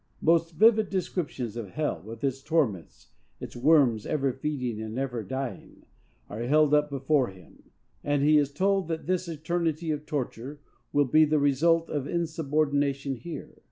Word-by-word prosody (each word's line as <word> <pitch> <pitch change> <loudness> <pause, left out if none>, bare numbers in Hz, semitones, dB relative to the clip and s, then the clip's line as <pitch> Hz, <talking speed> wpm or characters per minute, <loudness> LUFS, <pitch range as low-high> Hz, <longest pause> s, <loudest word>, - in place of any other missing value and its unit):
Most 165 0 +3
vivid 220 +3 +4
descriptions 155 - -3
of 115 -5 -5
hell, 150 0 -2
with 110 +3 -10
its 135 -1 -1
torments, 135 - -2 0.3
its - - -8
worms 125 -5 +3
ever 140 -4 0
feeding 125 -5 -3
and 110 0 -6
never 125 -3 -2
dying, 130 +5 -6 0.4
are 105 - -6
held 150 +4 +3
up 150 0 +3
before 140 -1 +1
him; 95 -3 -16 0.3
and 145 -1 +1
he 150 +1 +5
is 145 -1 0
told 195 +3 +1
that 165 -1 -4
this 185 0 -1
eternity 165 0 -2
of 150 0 -4
torture 140 -1 -4 0.3
will 145 0 +3
be 155 +5 +5
the 155 0 +2
result 160 +4 +2
of 145 -2 -2
insubordination 145 -4 0
here. 160 +7 -9
145 Hz, 160 wpm, -27 LUFS, 130-160 Hz, 0.4 s, he